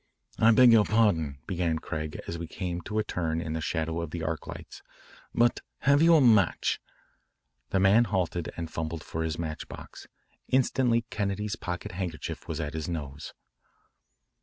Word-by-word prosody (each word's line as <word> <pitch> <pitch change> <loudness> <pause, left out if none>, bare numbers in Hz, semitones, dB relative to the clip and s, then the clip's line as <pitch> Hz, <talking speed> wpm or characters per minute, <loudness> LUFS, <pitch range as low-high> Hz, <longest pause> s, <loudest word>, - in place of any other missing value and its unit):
"I 115 - +6
beg 120 +2 +7
your 110 -2 +7
pardon," 95 -11 +2
began 85 -3 0
Craig 80 -1 -5
as 85 - -4
we 85 - -5
came 90 0 -4
to 105 - -3
a 110 - +2
turn 85 -5 -2
in 80 -2 -3
the 80 - -2
shadow 80 +1 -2
of 85 - -4
the 85 +1 -5
arc 80 -1 -3
lights, - - -9 0.5
"but 120 0 +3 0.2
have 140 +1 +4
you 165 0 +7
a 155 - +6
match?" 110 -8 +3 0.9
The 95 - +1
man 100 +5 +5
halted 90 -5 -1
and 85 -1 -5
fumbled 80 0 -3
for 80 - -4
his 80 0 -2
match 80 -2 -4
box. - - -11 0.4
Instantly 125 -3 +2
Kennedy's 105 0 -2
pocket 90 -1 -5
handkerchief 90 -5 -5
was 80 -2 -4
at 80 -1 -3
his 80 +1 -4
nose. 75 -4 -6
85 Hz, 170 wpm, -28 LUFS, 80-110 Hz, 0.9 s, beg